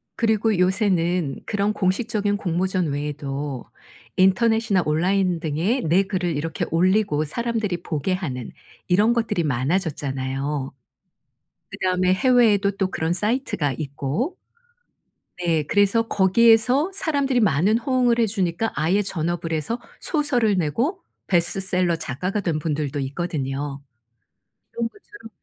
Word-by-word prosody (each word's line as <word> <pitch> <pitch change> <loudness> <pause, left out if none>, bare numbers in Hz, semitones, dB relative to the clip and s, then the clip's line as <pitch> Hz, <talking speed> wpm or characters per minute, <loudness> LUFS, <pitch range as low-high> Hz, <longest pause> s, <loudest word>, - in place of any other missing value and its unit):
그리고 220 -2 +1
요새는 180 -5 +1
그런 205 0 0
공식적인 205 +1 0
공모전 185 -1 -1
외에도 145 -2 -4 0.5
인터넷이나 205 +1 +3
온라인 180 +3 +1
등에 165 - 0
내 170 +5 +3
글을 180 -5 -2
이렇게 160 +2 -2
올리고 180 -2 +2
사람들이 215 -1 -2
보게 160 +3 -2
하는 135 - -4 0.4
이런 205 +6 +4
것들이 225 -7 0
많아졌잖아요. 140 -2 -2 1.0
그다음에 185 0 +1
해외에도 220 -3 +3
또 195 -1 -1
그런 160 +1 -1
사이트가 210 - 0
있고 150 - -3 1.1
네 165 -3 +2
그래서 205 +7 +3
거기에서 230 - +4
사람들이 280 -8 +1
많은 195 +3 +3
호응을 245 -1 +1
해 235 - +3
주니까 195 0 -1
아예 170 +8 +1
전업을 170 -2 -3
해서 160 - -2 0.2
소설을 250 - +1
내고 235 - 0 0.3
베스트셀러 180 -1 +1
작가가 160 +7 -3
된 170 -5 -1
분들도 150 -2 -2
있거든요. 140 -1 -3 0.9
이런 235 0 -1
것처럼 415 - -14
185 Hz, 300 characters per minute, -23 LUFS, 155-220 Hz, 1.1 s, 이런